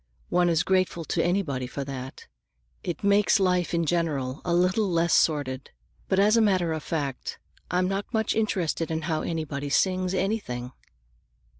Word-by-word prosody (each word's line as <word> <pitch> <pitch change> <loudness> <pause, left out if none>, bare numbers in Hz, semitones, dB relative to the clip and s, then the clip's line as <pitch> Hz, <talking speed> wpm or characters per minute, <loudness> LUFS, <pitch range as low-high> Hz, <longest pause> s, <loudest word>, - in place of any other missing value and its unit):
One 175 0 +3
is 165 -1 +2
grateful 185 -3 +1
to 165 - 0
anybody 170 -9 0
for 140 +2 -5
that; 130 -1 -7 0.6
it 175 0 -4
makes 200 +1 +4
life 180 -2 +1
in 170 -1 +1
general 150 -5 -1
a 175 - -2
little 185 +4 +2
less 170 -1 +2
sordid. 140 -4 +1 0.4
But 190 - +2
as 205 +3 +5
a 230 - +5
matter 185 -6 +2
of 160 - -3
fact, 140 -6 -3 0.3
I'm 180 0 +1
not 195 +2 -3
much 220 -2 +1
interested 180 -7 0
in 160 0 -2
how 160 -1 -1
anybody 150 -4 -3
sings 185 +4 +1
anything." 160 - -2
170 Hz, 160 wpm, -26 LUFS, 150-190 Hz, 0.6 s, as